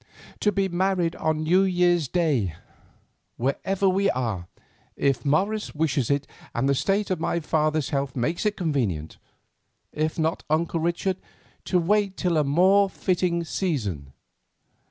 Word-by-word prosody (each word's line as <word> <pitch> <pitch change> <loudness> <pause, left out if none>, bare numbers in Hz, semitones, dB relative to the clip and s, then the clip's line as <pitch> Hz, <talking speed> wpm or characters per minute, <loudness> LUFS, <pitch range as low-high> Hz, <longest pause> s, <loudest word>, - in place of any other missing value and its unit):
"To 210 - +2
be 195 0 +1
married 180 -1 0
on 155 0 0
New 180 +4 +4
Year's 175 -4 +2
Day, 135 - 0 0.8
wherever 190 +10 0
we 195 +1 +2
are, 110 -9 -2 0.5
if 135 -4 +1
Morris 200 +10 0
wishes 145 -5 0
it 140 -1 +1 0.3
and 120 +3 +1
the 140 - +3
state 195 +8 0
of 185 - 0
my 170 - 0
father's 155 -2 0
health 140 -2 -1
makes 145 +7 -1
it 210 - -1
convenient. 120 - -2 0.7
If 155 +1 -2
not, 160 0 0
Uncle 165 +2 +1
Richard, 175 +3 -1 0.5
to 185 - +1
wait 195 +2 +1
till 175 -3 +1
a 150 - +3
more 190 +7 +4
fitting 180 -3 0
season." 105 - -3
165 Hz, 140 wpm, -25 LUFS, 140-185 Hz, 0.8 s, New